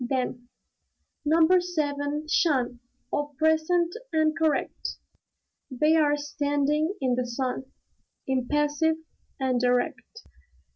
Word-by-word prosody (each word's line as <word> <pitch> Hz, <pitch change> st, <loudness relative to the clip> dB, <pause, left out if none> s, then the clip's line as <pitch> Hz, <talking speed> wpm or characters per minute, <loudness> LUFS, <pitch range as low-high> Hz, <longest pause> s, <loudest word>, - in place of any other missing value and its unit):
Then, 245 Hz, -1 st, -2 dB, 0.8 s
"Number 325 Hz, +4 st, +4 dB
Seven, 295 Hz, -3 st, -2 dB
'shun! 260 Hz, -7 st, +1 dB, 0.3 s
All 290 Hz, -1 st, -2 dB
present 320 Hz, +3 st, +2 dB, 0.2 s
and 315 Hz, -1 st, +2 dB
correct." 315 Hz, -3 st, -1 dB, 0.7 s
They're 300 Hz, +2 st, +3 dB
standing 290 Hz, +3 st, 0 dB
in 255 Hz, -2 st, +1 dB
the 250 Hz, 0 st, -1 dB
sun, 255 Hz, +2 st, -3 dB, 0.6 s
impassive 295 Hz, +4 st, +1 dB, 0.4 s
and 255 Hz, -2 st, 0 dB
erect. 250 Hz, -, -1 dB
290 Hz, 90 wpm, -26 LUFS, 260-315 Hz, 0.8 s, Number